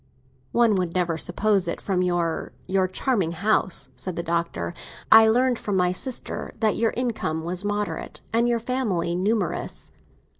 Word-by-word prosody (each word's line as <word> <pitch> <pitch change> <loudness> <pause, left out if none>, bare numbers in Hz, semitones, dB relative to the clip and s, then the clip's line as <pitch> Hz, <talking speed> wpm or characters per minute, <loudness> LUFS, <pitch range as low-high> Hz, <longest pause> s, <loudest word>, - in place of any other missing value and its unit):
"One 235 -2 +4
would 180 -2 -2
never 175 -2 +1
suppose 190 +3 +1
it - - -2
from 190 -3 -1
your—your 180 +2 -1
charming 185 -3 0
house," 190 +1 +1
said 185 -2 -5
the 170 - -3
Doctor. 170 - -2 0.4
"I 220 0 +9
learned 245 +2 +3
from 205 - -2
my 180 -1 +3
sister 250 +7 -3
that 220 -2 +2
your 225 0 +2
income 215 -10 -1
was 180 +3 -2
moderate, 205 0 -3
and 235 +1 +3
your 235 - +2
family 225 -8 -1
numerous." 195 0 -2
190 Hz, 150 wpm, -24 LUFS, 175-225 Hz, 0.4 s, I